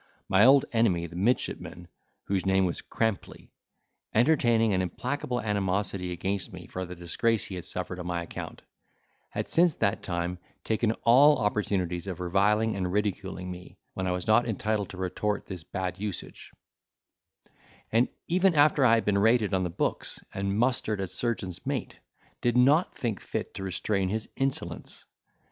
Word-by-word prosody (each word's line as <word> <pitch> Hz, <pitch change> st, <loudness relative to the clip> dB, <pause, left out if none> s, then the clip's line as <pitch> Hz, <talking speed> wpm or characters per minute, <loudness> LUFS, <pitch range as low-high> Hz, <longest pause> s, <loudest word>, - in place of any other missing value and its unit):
My 95 Hz, +3 st, +5 dB
old 135 Hz, +1 st, +7 dB
enemy, 110 Hz, -8 st, +2 dB
the 85 Hz, 0 st, -10 dB
midshipman 90 Hz, -4 st, -1 dB, 0.4 s
(whose 95 Hz, -2 st, -1 dB
name 95 Hz, 0 st, +3 dB
was 85 Hz, -, -2 dB
Crampley), 110 Hz, -3 st, -3 dB, 0.6 s
entertaining 115 Hz, -4 st, +4 dB
an 95 Hz, -, +2 dB
implacable 125 Hz, +7 st, -2 dB
animosity 100 Hz, -3 st, -1 dB
against 95 Hz, +3 st, -2 dB
me 90 Hz, -1 st, -9 dB
for 95 Hz, 0 st, -5 dB
the 90 Hz, 0 st, -8 dB
disgrace 95 Hz, +6 st, 0 dB
he -, -, -8 dB
had 90 Hz, -2 st, -6 dB
suffered 90 Hz, 0 st, -4 dB
on 90 Hz, -, -5 dB
my 85 Hz, -1 st, -2 dB
account, -, -, -8 dB, 0.7 s
had -, -, -3 dB
since 170 Hz, -2 st, +3 dB
that 100 Hz, -, 0 dB
time 85 Hz, 0 st, -3 dB, 0.2 s
taken 110 Hz, 0 st, +1 dB
all 140 Hz, +5 st, +7 dB
opportunities 100 Hz, -5 st, -1 dB
of 90 Hz, -2 st, -5 dB
reviling 105 Hz, +5 st, +2 dB
and 90 Hz, -2 st, -2 dB
ridiculing 95 Hz, -2 st, -2 dB
me, 90 Hz, 0 st, -10 dB, 0.2 s
when 95 Hz, 0 st, -3 dB
I -, -, +1 dB
was 90 Hz, 0 st, -2 dB
not 120 Hz, +3 st, +4 dB
entitled 105 Hz, -2 st, -1 dB
to 95 Hz, -, -9 dB
retort 100 Hz, +3 st, -2 dB
this 90 Hz, -4 st, -7 dB
bad 95 Hz, +2 st, -4 dB
usage; 100 Hz, -4 st, -6 dB, 1.4 s
and, 115 Hz, +3 st, +4 dB, 0.2 s
even 185 Hz, 0 st, +3 dB
after 145 Hz, -1 st, +5 dB
I 115 Hz, -3 st, +6 dB
had 115 Hz, -, 0 dB
been 100 Hz, -1 st, +2 dB
rated 110 Hz, -1 st, +3 dB
on 95 Hz, -1 st, +2 dB
the 90 Hz, -, -1 dB
books, 85 Hz, -, -2 dB
and 100 Hz, +1 st, -1 dB
mustered 115 Hz, -3 st, +1 dB
as 95 Hz, -2 st, -3 dB
surgeon's 110 Hz, -7 st, -3 dB
mate, -, -, -3 dB, 0.4 s
did 120 Hz, 0 st, +2 dB
not 145 Hz, +8 st, +4 dB
think 115 Hz, -6 st, -3 dB
fit -, -, -4 dB
to -, -, -7 dB
restrain 95 Hz, 0 st, -1 dB
his 110 Hz, +2 st, -2 dB
insolence. 135 Hz, 0 st, -3 dB
100 Hz, 160 wpm, -28 LUFS, 90-115 Hz, 1.4 s, old